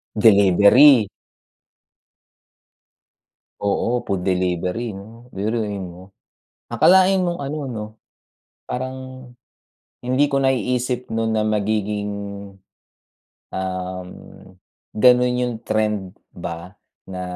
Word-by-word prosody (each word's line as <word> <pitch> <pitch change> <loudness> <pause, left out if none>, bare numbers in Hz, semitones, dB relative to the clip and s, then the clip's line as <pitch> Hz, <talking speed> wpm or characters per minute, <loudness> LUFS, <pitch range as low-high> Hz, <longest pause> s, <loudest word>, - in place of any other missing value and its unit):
Delivery. 105 +4 +6 2.5
Oo, 115 +4 -1
food 95 -2 -2
delivery 90 +4 -1
'no, 115 +5 -13
biruin 105 0 -2
mo. 90 +2 -11 0.5
Akalain 190 +1 +4
mong 175 -1 -2
ano 140 +2 -4
'no, 105 -2 -5 0.9
parang, 130 +1 -4 1.1
hindi 130 +4 +2
ko 140 -1 0
naiisip 125 -1 0
noon 115 0 0
na 110 -1 0
magiging, 105 -1 -1 1.4
um, 95 -1 -4 0.9
ganoon 125 +1 +4
yung 125 -1 -1
trend 105 -4 -2 0.2
ba 85 +3 -7 0.3
na 95 -1 -7
110 Hz, 85 wpm, -21 LUFS, 95-125 Hz, 2.5 s, Delivery